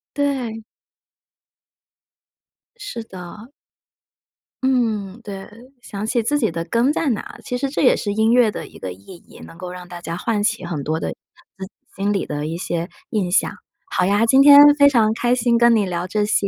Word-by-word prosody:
对。 260 Hz, -6 st, -2 dB, 2.1 s
是 410 Hz, -, -7 dB
的。 195 Hz, +3 st, -11 dB, 1.2 s
嗯， 225 Hz, -5 st, 0 dB
对， 195 Hz, -2 st, -7 dB, 0.4 s
想 205 Hz, -2 st, -6 dB
起 235 Hz, 0 st, 0 dB
自 290 Hz, +5 st, 0 dB
己 -, -, +1 dB
的 165 Hz, 0 st, -4 dB
根 235 Hz, -, +1 dB
在 310 Hz, -3 st, 0 dB
哪， 220 Hz, -, -4 dB
其 250 Hz, -, -3 dB
实 275 Hz, +1 st, -2 dB
这 290 Hz, -, -2 dB
也 255 Hz, -, +4 dB
是 205 Hz, -, -3 dB
音 220 Hz, +2 st, +2 dB
乐 240 Hz, -3 st, +4 dB
的 -, -, -6 dB
一 -, -, -15 dB
个 95 Hz, -1 st, -5 dB
意 100 Hz, -, -14 dB
义， -, -, -15 dB
能 165 Hz, -, -14 dB
够 180 Hz, 0 st, -7 dB
让 180 Hz, -1 st, -10 dB
大 175 Hz, -1 st, -8 dB
家 170 Hz, -1 st, -5 dB
唤 210 Hz, +3 st, -1 dB
起 205 Hz, -3 st, -1 dB
很 170 Hz, -4 st, -4 dB
多 160 Hz, +1 st, -2 dB
的 -, -, -2 dB
自 190 Hz, 0 st, -12 dB
己 190 Hz, -, -14 dB, 0.3 s
心 200 Hz, +1 st, 0 dB
里 195 Hz, -, -1 dB
的 150 Hz, +1 st, -4 dB
一 165 Hz, +1 st, -4 dB
些 170 Hz, 0 st, -3 dB, 0.2 s
印 200 Hz, -5 st, -1 dB
象。 175 Hz, -, +2 dB, 0.4 s
好 180 Hz, -, +1 dB
呀， 205 Hz, +4 st, +2 dB
今 265 Hz, +4 st, +5 dB
天 285 Hz, 0 st, +9 dB, 0.2 s
非 285 Hz, -, +8 dB
常 225 Hz, -5 st, +3 dB
开 240 Hz, +2 st, +1 dB
心 235 Hz, -1 st, +2 dB
跟 235 Hz, 0 st, +5 dB
你 210 Hz, -3 st, +2 dB
聊 175 Hz, 0 st, -3 dB
这 210 Hz, +2 st, 0 dB
些， 205 Hz, -1 st, +1 dB
210 Hz, 210 characters per minute, -20 LUFS, 180-240 Hz, 2.1 s, 天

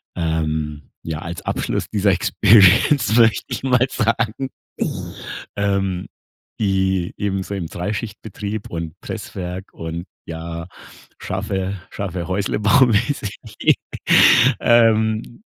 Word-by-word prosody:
ähm, 75 Hz, -3 st, -2 dB
ja, 80 Hz, -2 st, -4 dB
als 85 Hz, +1 st, -6 dB
Abschluss -, -, -2 dB
dieser 100 Hz, -2 st, +2 dB
Experience, 105 Hz, -, +5 dB
möchte 115 Hz, -2 st, +4 dB
ich -, -, -5 dB
mal 130 Hz, -1 st, +3 dB
sagen, 115 Hz, +3 st, 0 dB, 1.1 s
ähm 95 Hz, -2 st, 0 dB, 0.5 s
die 95 Hz, -3 st, +1 dB
eben 95 Hz, -1 st, -1 dB
so 100 Hz, -, -6 dB
im 85 Hz, -4 st, -4 dB
Dreischichtbetrieb 105 Hz, +2 st, -5 dB
und 85 Hz, -2 st, -6 dB
Presswerk 90 Hz, +1 st, -6 dB
und 85 Hz, +1 st, -5 dB, 0.2 s
ja, 85 Hz, 0 st, -6 dB, 0.5 s
schaffe 95 Hz, 0 st, -3 dB
schaffe 90 Hz, -4 st, -4 dB
Häusle-Bau-mäßig. 105 Hz, +4 st, +2 dB, 1.2 s
Ähm, 110 Hz, -, +3 dB
95 Hz, 95 wpm, -20 LUFS, 85-110 Hz, 1.2 s, Experience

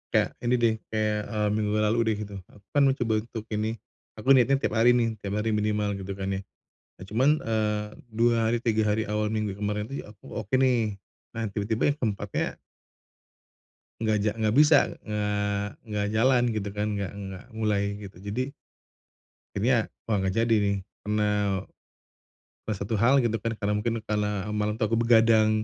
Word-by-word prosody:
kayak -, -, +3 dB
ini 120 Hz, 0 st, 0 dB
deh 115 Hz, -2 st, +3 dB
kayak, 105 Hz, -1 st, 0 dB
eee, 105 Hz, -2 st, 0 dB
minggu 105 Hz, 0 st, 0 dB
lalu 105 Hz, +1 st, +2 dB
udah 110 Hz, -, +3 dB
gitu, 100 Hz, -1 st, -9 dB
aku 100 Hz, -1 st, -20 dB
kan 145 Hz, -, +3 dB
mau 135 Hz, -, +3 dB
coba 115 Hz, -4 st, 0 dB
untuk 110 Hz, 0 st, -7 dB
ini, 110 Hz, +1 st, -1 dB, 0.4 s
aku 110 Hz, +3 st, -10 dB
niatnya 130 Hz, 0 st, +6 dB
tiap -, -, 0 dB
hari 120 Hz, +2 st, +6 dB
nih, 115 Hz, -3 st, 0 dB
tiap 100 Hz, 0 st, -4 dB
hari 115 Hz, -, 0 dB
minimal 105 Hz, -1 st, 0 dB
gitu 95 Hz, 0 st, -5 dB
kan 95 Hz, 0 st, -3 dB
ya. -, -, -7 dB, 0.5 s
Nah -, -, -11 dB
cuman, 115 Hz, +9 st, +2 dB
eee, 105 Hz, -2 st, 0 dB, 0.3 s
2 115 Hz, +1 st, +4 dB
hari, 120 Hz, +1 st, +2 dB
3 110 Hz, -2 st, +2 dB
hari 105 Hz, +1 st, +1 dB
awal 105 Hz, 0 st, 0 dB
minggu 105 Hz, -1 st, -1 dB
kemarin 105 Hz, +2 st, -2 dB
itu 140 Hz, -, -5 dB
aku 105 Hz, 0 st, -16 dB
oke 110 Hz, +3 st, -2 dB
nih, 120 Hz, -5 st, +2 dB, 0.4 s
nah 115 Hz, -, -2 dB
tiba-tiba 110 Hz, +6 st, +1 dB
yang 145 Hz, -, -5 dB
ke-4-nya 105 Hz, -6 st, -2 dB, 1.5 s
nggak 110 Hz, -1 st, +2 dB
ja 105 Hz, -, +2 dB
nggak 110 Hz, +1 st, 0 dB
bisa, 150 Hz, +1 st, +7 dB, 0.3 s
eee, 105 Hz, -1 st, -1 dB, 0.2 s
nggak 105 Hz, -2 st, -2 dB
jalan 125 Hz, +2 st, +4 dB
gitu 105 Hz, -1 st, -2 dB
kan, 105 Hz, +1 st, -2 dB
nggak 100 Hz, -2 st, -3 dB
nggak 95 Hz, -2 st, -7 dB
mulai 105 Hz, -2 st, -1 dB
gitu. 100 Hz, -3 st, -10 dB
Jadi 110 Hz, +9 st, -4 dB, 1.0 s
akhirnya 115 Hz, +2 st, +2 dB, 0.2 s
wah 110 Hz, -, 0 dB
nggak 95 Hz, 0 st, 0 dB
jadi 115 Hz, -, +3 dB
nih 100 Hz, 0 st, +1 dB, 0.3 s
karena, 105 Hz, -2 st, +1 dB, 1.0 s
eee, 110 Hz, -, -1 dB
satu 100 Hz, +3 st, -3 dB
hal 130 Hz, +6 st, +5 dB
gitu 115 Hz, -1 st, 0 dB
kan 115 Hz, +2 st, -2 dB
karena 105 Hz, -1 st, -1 dB
mungkin 115 Hz, +2 st, -1 dB
karena 105 Hz, -1 st, -1 dB
malam 105 Hz, 0 st, 0 dB
itu 110 Hz, +1 st, -1 dB
aku 115 Hz, +1 st, +1 dB
begadang. 115 Hz, -2 st, +5 dB
105 Hz, 180 wpm, -27 LUFS, 105-115 Hz, 1.5 s, bisa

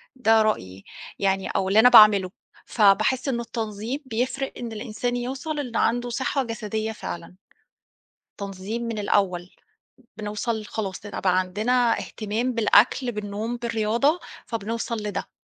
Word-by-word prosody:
ده 225 Hz, -3 st, +4 dB
رأيي 95 Hz, -, -2 dB, 0.4 s
يعني 195 Hz, -1 st, +1 dB
أو 190 Hz, -1 st, -1 dB
اللي 200 Hz, +3 st, +4 dB
أنا 245 Hz, +3 st, +8 dB
باعمله. 210 Hz, -6 st, +7 dB, 0.3 s
فباحس 215 Hz, +5 st, +3 dB
إنه 240 Hz, -3 st, 0 dB
التنظيم 225 Hz, +2 st, -4 dB
بيفرق 260 Hz, +3 st, -2 dB
إن 235 Hz, -2 st, -5 dB
الإنسان 235 Hz, +2 st, -3 dB
يوصل 265 Hz, +5 st, -3 dB
ال 245 Hz, -5 st, -5 dB
عنده 245 Hz, +1 st, +1 dB
صحّة 265 Hz, +2 st, -1 dB
جسدية 220 Hz, -2 st, -3 dB
فعلًا، 175 Hz, -4 st, -7 dB, 1.1 s
تنظيم 200 Hz, +4 st, -5 dB
من 230 Hz, -2 st, -3 dB
الأول، 185 Hz, -3 st, 0 dB, 0.7 s
بنوصل 215 Hz, +1 st, -3 dB
خلاص 205 Hz, -2 st, -5 dB
ال 205 Hz, -, -5 dB
بقى 185 Hz, -1 st, +2 dB
عندنا 220 Hz, +6 st, +1 dB
اهتمام 225 Hz, +4 st, -3 dB
بالأكل، 230 Hz, +2 st, +3 dB
بالنوم، 210 Hz, +3 st, -4 dB
بالرياضة 235 Hz, +7 st, +1 dB, 0.3 s
فبنوصل 230 Hz, +1 st, -3 dB
لده. 205 Hz, -2 st, -4 dB
220 Hz, 130 wpm, -24 LUFS, 205-245 Hz, 1.1 s, أنا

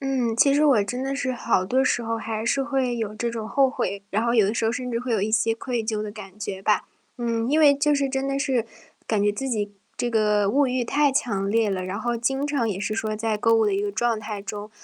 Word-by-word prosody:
嗯， 260 Hz, -4 st, 0 dB
其 275 Hz, +4 st, +5 dB
实 295 Hz, +2 st, +3 dB
我 265 Hz, -8 st, +5 dB
真 245 Hz, +6 st, -4 dB
的 270 Hz, +1 st, -2 dB
是 275 Hz, -2 st, -1 dB
好 235 Hz, -6 st, +1 dB
多 260 Hz, +7 st, +2 dB
时 240 Hz, -, +1 dB
候， 230 Hz, 0 st, -2 dB
还 225 Hz, -1 st, -4 dB
是 270 Hz, +4 st, +1 dB
会 265 Hz, -3 st, -1 dB
有 215 Hz, -2 st, -3 dB
这 235 Hz, +2 st, -2 dB
种 225 Hz, -2 st, -5 dB
后 270 Hz, 0 st, +3 dB
悔， 200 Hz, -6 st, -3 dB
然 215 Hz, +3 st, 0 dB
后 235 Hz, 0 st, +1 dB
有 215 Hz, -4 st, +5 dB
的 205 Hz, -, 0 dB
时 225 Hz, -, -1 dB
候 225 Hz, -, +2 dB
甚 250 Hz, 0 st, -4 dB
至 230 Hz, -, -1 dB
会 250 Hz, 0 st, -3 dB
有 210 Hz, -3 st, +1 dB
一 215 Hz, -, 0 dB
些 225 Hz, +1 st, +2 dB
愧 235 Hz, -1 st, -3 dB
疚 215 Hz, -1 st, -1 dB
的 210 Hz, -, -5 dB
感 205 Hz, -2 st, -11 dB
觉 200 Hz, -2 st, -5 dB
吧。 210 Hz, +2 st, +2 dB, 0.4 s
嗯， 230 Hz, -1 st, -1 dB
因 305 Hz, +3 st, +3 dB
为 295 Hz, -2 st, +7 dB
就 295 Hz, +1 st, +2 dB
是 280 Hz, -1 st, +1 dB
真 270 Hz, 0 st, -2 dB
的 275 Hz, 0 st, -1 dB
是 265 Hz, -5 st, 0 dB, 0.4 s
感 215 Hz, -2 st, +1 dB
觉 205 Hz, -, +3 dB
自 235 Hz, +6 st, -4 dB
己 210 Hz, -4 st, -1 dB, 0.3 s
这 240 Hz, -, -1 dB
个 210 Hz, -3 st, +2 dB
物 280 Hz, +5 st, +3 dB
欲 255 Hz, 0 st, 0 dB
太 285 Hz, +4 st, +2 dB
强 205 Hz, -7 st, 0 dB
烈 220 Hz, 0 st, +2 dB
了， 185 Hz, -1 st, -2 dB
然 190 Hz, +3 st, -4 dB
后 240 Hz, 0 st, -1 dB
经 270 Hz, +4 st, -1 dB
常 285 Hz, -6 st, 0 dB
也 195 Hz, -2 st, -3 dB
是 215 Hz, +1 st, -2 dB
说 215 Hz, -1 st, -2 dB
在 220 Hz, 0 st, -1 dB
购 230 Hz, +2 st, +3 dB
物 225 Hz, -1 st, +4 dB
的 205 Hz, -, +1 dB
一 195 Hz, -, 0 dB
个 205 Hz, 0 st, -2 dB
状 230 Hz, +1 st, 0 dB
态 210 Hz, -1 st, -6 dB
中。 205 Hz, +1 st, -6 dB
230 Hz, 295 characters per minute, -24 LUFS, 210-260 Hz, 0.4 s, 为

